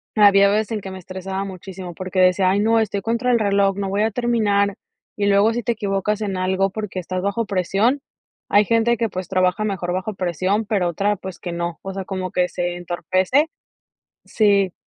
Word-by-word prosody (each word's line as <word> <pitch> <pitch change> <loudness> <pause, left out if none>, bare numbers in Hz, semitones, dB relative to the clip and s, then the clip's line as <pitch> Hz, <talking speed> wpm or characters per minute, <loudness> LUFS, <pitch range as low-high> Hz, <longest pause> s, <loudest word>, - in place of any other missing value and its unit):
había 200 -1 +6
veces 215 +2 0
en 215 - -1
que 190 - -7
me 190 - -7
estresaba 190 +2 -5
muchísimo 185 -1 -8
porque 185 +1 -4
decía: 185 0 +4
"Ay, 200 - +2
no, 225 +1 +3
estoy 205 -2 -1
contra 235 +4 0
el 235 - +3
reloj, 200 -2 +2
no 195 -1 -2
voy 205 +2 +1
a 220 - +1
terminar", 205 -4 +1 0.4
y 200 - 0
luego 205 +3 +4
si 240 - -2
te 235 - +1
equivocas 205 0 -1
en 195 -3 -2
algo, 190 +1 +1
porque 200 -2 -5
estás 185 +1 -4
bajo 200 +4 -1
presión, 200 +7 +1 0.5
hay 205 0 +5
gente 230 +1 +2
que, 230 -2 0
pues, 185 0 -5
trabaja 185 +2 +1
mejor 180 -4 -2
bajo 190 +3 -3
presión, 185 +4 -1
pero 195 -4 0
otra, 200 +5 0
pues, 190 -1 -8
que 175 - -5
no. 170 -1 -3
O 195 0 -6
sea, 190 -1 -5
como 185 -1 -4
que 180 0 +1
se 175 0 -2
entorpece. 185 - 0 0.8
Sí, 200 -4 +2
195 Hz, 200 wpm, -21 LUFS, 185-215 Hz, 0.8 s, había